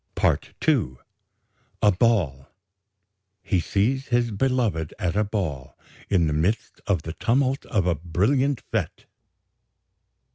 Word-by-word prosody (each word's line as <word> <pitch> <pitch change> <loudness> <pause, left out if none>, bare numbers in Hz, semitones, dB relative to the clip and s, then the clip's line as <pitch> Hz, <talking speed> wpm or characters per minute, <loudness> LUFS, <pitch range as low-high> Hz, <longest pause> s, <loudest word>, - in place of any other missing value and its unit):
"PART - - 0
II 65 - +2 0.9
"A 105 - +7
BALL 90 - +1 1.0
"He 95 - +1
sees 120 +10 0
his 120 -1 +1
beloved 110 - 0
at 90 -4 -1
a 105 - +3
ball, 90 - -4 0.3
in 90 -5 +3
the 75 - 0
midst 85 +9 -1
of 90 -6 +1
the 80 - -5
tumult 130 +6 0
of 100 -6 +1
a 90 - +3
brilliant 105 - 0
fête. 105 -8 -2
100 Hz, 120 wpm, -24 LUFS, 80-120 Hz, 1.0 s, A